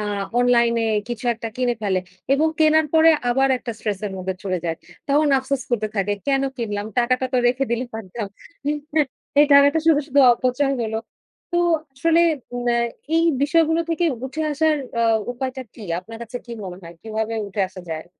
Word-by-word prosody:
আ -, -, -2 dB, 0.4 s
online 240 Hz, -1 st, +4 dB
এ -, -, 0 dB, 0.2 s
কিছু 240 Hz, 0 st, -5 dB
একটা 230 Hz, 0 st, -6 dB
কিনে 250 Hz, -1 st, +1 dB
ফেলে, 190 Hz, -3 st, +1 dB, 0.3 s
এবং 310 Hz, +3 st, +2 dB
কেনার 315 Hz, 0 st, +4 dB
পরে 320 Hz, 0 st, +7 dB, 0.2 s
আবার 270 Hz, +2 st, +3 dB
একটা 240 Hz, -1 st, -5 dB
স্ট্রেস 210 Hz, -3 st, -3 dB
এর 195 Hz, -, -5 dB
মধ্যে 185 Hz, 0 st, -3 dB
চলে 185 Hz, -2 st, -1 dB
যায়। 165 Hz, -1 st, -1 dB, 0.3 s
তখন 290 Hz, +2 st, +3 dB
আফসোস 265 Hz, 0 st, -2 dB
করতে 220 Hz, -3 st, 0 dB
থাকে 200 Hz, +1 st, +1 dB
কেন 275 Hz, -1 st, +2 dB
কিনলাম, 210 Hz, -3 st, -3 dB
টাকাটা 255 Hz, +2 st, +2 dB
তো -, -, +2 dB
রেখে 255 Hz, +3 st, +2 dB
দিলেই 240 Hz, +1 st, -1 dB
পারতাম। 220 Hz, 0 st, -5 dB, 1.1 s
এই 295 Hz, -, +6 dB
টাকাটা 285 Hz, +2 st, +6 dB
শুধু, 315 Hz, -3 st, +5 dB
শুধু 280 Hz, -1 st, +3 dB
অপচয় 255 Hz, +3 st, 0 dB
হল। 220 Hz, -1 st, -3 dB, 0.6 s
তো 345 Hz, -, +2 dB, 0.4 s
আসলে 330 Hz, +5 st, +3 dB, 0.3 s
মানে 245 Hz, 0 st, 0 dB, 0.4 s
এই 330 Hz, -, +3 dB, 0.2 s
বিষয়গুলো 325 Hz, +2 st, +3 dB
থেকে 335 Hz, +1 st, 0 dB, 0.2 s
উঠে 270 Hz, +4 st, -6 dB
আসার 310 Hz, +1 st, +2 dB, 0.2 s
আ -, -, +3 dB, 0.3 s
উপায়টা 260 Hz, +1 st, -4 dB
কী? 225 Hz, -, -11 dB, 0.2 s
আপনার 225 Hz, +5 st, -10 dB
কাছে 235 Hz, +2 st, -7 dB
কি -, -, -11 dB
মনে 180 Hz, -2 st, -7 dB
হয়? 170 Hz, 0 st, -11 dB
কীভাবে 220 Hz, 0 st, -3 dB
উঠে 200 Hz, +1 st, -4 dB
আসা 185 Hz, 0 st, -10 dB
যায়? 160 Hz, +1 st, -5 dB
245 Hz, 180 wpm, -22 LUFS, 220-285 Hz, 1.1 s, পরে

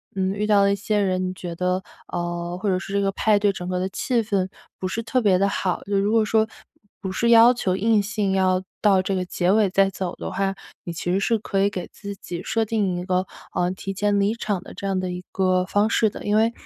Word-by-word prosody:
嗯， 190 Hz, -1 st, 0 dB
遇 210 Hz, +1 st, -1 dB
到 205 Hz, -2 st, +5 dB
了 200 Hz, 0 st, +3 dB
一 -, -, +1 dB
些 205 Hz, +1 st, -1 dB
人， 185 Hz, -2 st, 0 dB
你 185 Hz, -, -5 dB
觉 175 Hz, -2 st, -6 dB
得， 180 Hz, +2 st, 0 dB, 0.3 s
呃， 175 Hz, 0 st, -3 dB
或 215 Hz, -, -1 dB
者 185 Hz, -2 st, +2 dB
是 195 Hz, -, -8 dB
这 200 Hz, -, +2 dB
个 195 Hz, 0 st, +1 dB
派 210 Hz, +1 st, +3 dB
对 205 Hz, -1 st, +2 dB
整 180 Hz, -1 st, -6 dB
个 180 Hz, 0 st, -1 dB
的 185 Hz, -, -1 dB
气 235 Hz, +4 st, 0 dB
氛， 195 Hz, -3 st, 0 dB, 0.3 s
不 185 Hz, -, -2 dB
是 230 Hz, -, -3 dB
特 250 Hz, +2 st, 0 dB
别 195 Hz, -4 st, +4 dB
地 200 Hz, +1 st, +2 dB
好。 185 Hz, -2 st, -1 dB
就 200 Hz, 0 st, 0 dB
如 205 Hz, +2 st, +1 dB
果 225 Hz, -1 st, +3 dB
说， 220 Hz, +1 st, +3 dB, 0.5 s
不 190 Hz, -, -4 dB
是 235 Hz, +5 st, +1 dB
要 235 Hz, +1 st, +8 dB
求 190 Hz, -7 st, -1 dB
硬 220 Hz, +1 st, +3 dB
性 205 Hz, -1 st, -1 dB
要 185 Hz, -1 st, +2 dB, 0.2 s
到 195 Hz, -3 st, +4 dB
这 195 Hz, -, -1 dB
个 185 Hz, -, 0 dB
结 180 Hz, 0 st, 0 dB
尾 210 Hz, -1 st, +4 dB
再 195 Hz, +1 st, +3 dB
走 185 Hz, -2 st, -4 dB
的 -, -, -6 dB
话， 195 Hz, 0 st, 0 dB, 0.3 s
你 175 Hz, -, -5 dB
其 170 Hz, +1 st, -3 dB
实 190 Hz, -, +2 dB
是 225 Hz, +3 st, +2 dB
可 195 Hz, -2 st, -1 dB
以 200 Hz, -, +3 dB
给 185 Hz, -3 st, -5 dB
自 200 Hz, -1 st, -7 dB
己 175 Hz, -2 st, -7 dB
设 225 Hz, 0 st, 0 dB
定 200 Hz, -5 st, 0 dB
一 180 Hz, -, -4 dB
个， 185 Hz, 0 st, +1 dB, 0.3 s
呃， 175 Hz, -, +1 dB
提 195 Hz, +1 st, -5 dB
前 205 Hz, +1 st, +1 dB
离 200 Hz, +2 st, +2 dB
场 210 Hz, -5 st, -2 dB
的 -, -, -11 dB
这 195 Hz, -, -5 dB
样 190 Hz, -1 st, 0 dB
的 185 Hz, -1 st, -3 dB
一 180 Hz, 0 st, -6 dB
个 185 Hz, -1 st, +2 dB
方 205 Hz, +3 st, +2 dB
式 225 Hz, -1 st, +2 dB
的。 -, -, -9 dB
因 205 Hz, 0 st, +1 dB
为， 225 Hz, +1 st, +4 dB
195 Hz, 280 characters per minute, -23 LUFS, 185-210 Hz, 0.5 s, 要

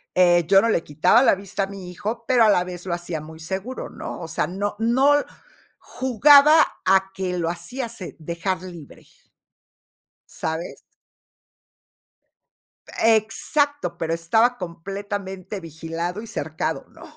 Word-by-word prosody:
Eh, 175 Hz, -2 st, +4 dB
yo 195 Hz, +2 st, +6 dB
no 230 Hz, -, +1 dB
le 170 Hz, -, +1 dB
quitaba 155 Hz, +10 st, +3 dB
la 260 Hz, -, +5 dB
vista 195 Hz, +1 st, -4 dB
a -, -, -3 dB
mi 190 Hz, -2 st, -9 dB
hijo, 215 Hz, +5 st, -5 dB
pero 250 Hz, -3 st, +4 dB
a -, -, +5 dB
la 180 Hz, -3 st, +3 dB
vez 180 Hz, 0 st, -8 dB
lo 180 Hz, -, -2 dB
hacía 175 Hz, -2 st, -4 dB
muy 160 Hz, +1 st, -11 dB
seguro, 190 Hz, +10 st, -5 dB
¿no? -, -, -7 dB
O 165 Hz, -, -6 dB
sea, 165 Hz, -, -1 dB
no 200 Hz, +3 st, -3 dB
no 260 Hz, +6 st, +4 dB
l -, -, -5 dB, 0.5 s
jugaba 280 Hz, +4 st, +5 dB, 0.3 s
a 190 Hz, 0 st, +3 dB
que 185 Hz, -2 st, -3 dB
lo 165 Hz, -1 st, -1 dB
hacía 235 Hz, +9 st, -4 dB
se 225 Hz, -6 st, -7 dB
dejar 170 Hz, +3 st, -3 dB
libre 170 Hz, -6 st, -11 dB, 1.2 s
¿sabes? 160 Hz, +2 st, -5 dB, 2.2 s
Exacto, 230 Hz, +7 st, +1 dB
pero 165 Hz, 0 st, -2 dB
estaba 220 Hz, +9 st, +2 dB
completamente 195 Hz, +2 st, -6 dB
vigilado 165 Hz, +3 st, -5 dB
y 230 Hz, -, -10 dB
cercado, 155 Hz, -5 st, -3 dB
¿no? -, -, -16 dB
190 Hz, 145 wpm, -23 LUFS, 170-225 Hz, 2.2 s, yo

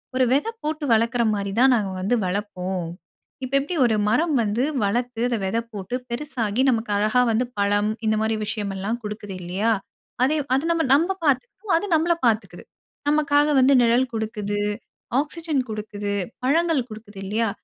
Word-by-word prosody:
"ஒரு 255 Hz, 0 st, +4 dB
விதை 295 Hz, +12 st, +1 dB
போட்டு 305 Hz, 0 st, -2 dB
வளக்கிற 230 Hz, +2 st, +2 dB
மாரி 200 Hz, -1 st, -3 dB
தான், 260 Hz, 0 st, +6 dB
நாங்க 205 Hz, -4 st, -1 dB
வந்து 200 Hz, +6 st, +1 dB
வளப்போம். 185 Hz, -2 st, -3 dB, 0.6 s
இப்போ 265 Hz, +2 st, -2 dB
எப்படி 290 Hz, +6 st, -4 dB
ஒரு 225 Hz, -, +2 dB
மரம் 310 Hz, +6 st, +2 dB
வந்து 215 Hz, +4 st, 0 dB, 0.2 s
வளர்த்து, 235 Hz, +3 st, -1 dB
அதை 235 Hz, -, 0 dB
விதை 225 Hz, +5 st, 0 dB
போட்டு, 200 Hz, +4 st, -4 dB
பெருசாகி 240 Hz, -3 st, -2 dB
நமக்கு 225 Hz, -3 st, 0 dB
அழகா 215 Hz, +4 st, +3 dB
வந்து 230 Hz, +3 st, +1 dB
பழம், 205 Hz, +1 st, +2 dB, 0.2 s
இந்த 215 Hz, -, +3 dB
மாரி 220 Hz, 0 st, +1 dB
விஷயம் 210 Hz, -1 st, -3 dB
எல்லாம் 220 Hz, +5 st, -2 dB
குடுக்குது. 210 Hz, -1 st, -6 dB
இல்லையா? 195 Hz, +6 st, 0 dB, 0.5 s
அதே 305 Hz, +4 st, +2 dB, 0.2 s
அது 275 Hz, -, 0 dB
நம்ம 335 Hz, -1 st, +1 dB
நம்ப 335 Hz, +7 st, +3 dB
பாத்துக்கும். 360 Hz, -, 0 dB
அது 375 Hz, -, -2 dB
நம்மள 330 Hz, +2 st, +3 dB
பாத்துக்குது. 225 Hz, -1 st, 0 dB, 0.5 s
நமக்காக 295 Hz, 0 st, +3 dB
வந்து 265 Hz, +2 st, +5 dB
நிழல் 240 Hz, +2 st, +3 dB
குடுக்குது. 210 Hz, -2 st, -2 dB, 0.6 s
ஆக்சிஜன் 310 Hz, -2 st, -2 dB
குடுக்குது. 210 Hz, -1 st, -4 dB, 0.3 s
பழங்கள் 305 Hz, -2 st, +2 dB
குடுக்குது 215 Hz, -2 st, -10 dB
இல்லையா? 220 Hz, +3 st, 0 dB
230 Hz, 155 wpm, -23 LUFS, 210-280 Hz, 0.6 s, தான்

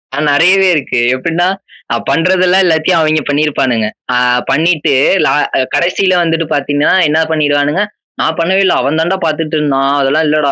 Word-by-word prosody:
ஆ 145 Hz, -, -2 dB
நெறையவே 185 Hz, +6 st, +3 dB
இருக்கு. 135 Hz, -4 st, -2 dB, 0.2 s
எப்பிடின்னா, 165 Hz, +6 st, -1 dB, 0.5 s
அ -, -, +1 dB
பண்றதெல்லாம் 185 Hz, +2 st, +2 dB
எல்லாத்தையும் 165 Hz, +1 st, +1 dB
அவெங்க 155 Hz, -1 st, +1 dB
பண்ணிருப்பானுங்க. 135 Hz, -6 st, 0 dB, 0.3 s
அ 125 Hz, -, +1 dB, 0.3 s
பண்ணிட்டு 160 Hz, 0 st, +1 dB, 0.3 s
லா -, -, +2 dB, 0.4 s
கடைசில 185 Hz, +2 st, +1 dB
வந்துட்டு 165 Hz, 0 st, -1 dB
பாத்தீங்கன்னா, 145 Hz, +1 st, 0 dB, 0.2 s
என்ன 155 Hz, +2 st, +1 dB
பண்ணிடுவானுங்க, 145 Hz, +3 st, 0 dB, 0.4 s
"நான் 160 Hz, -, -1 dB
பண்ணவே 190 Hz, +4 st, +1 dB
இல்ல. -, -, +2 dB
அவன் 145 Hz, +5 st, -1 dB
தாண்டா! 180 Hz, +4 st, -1 dB
பாத்துட்டு 155 Hz, 0 st, -2 dB
இருந்தான். 140 Hz, -1 st, 0 dB
அதெல்லாம் 145 Hz, +4 st, +1 dB
இல்லடா!" 150 Hz, -2 st, +1 dB
155 Hz, 150 wpm, -12 LUFS, 145-175 Hz, 0.5 s, நெறையவே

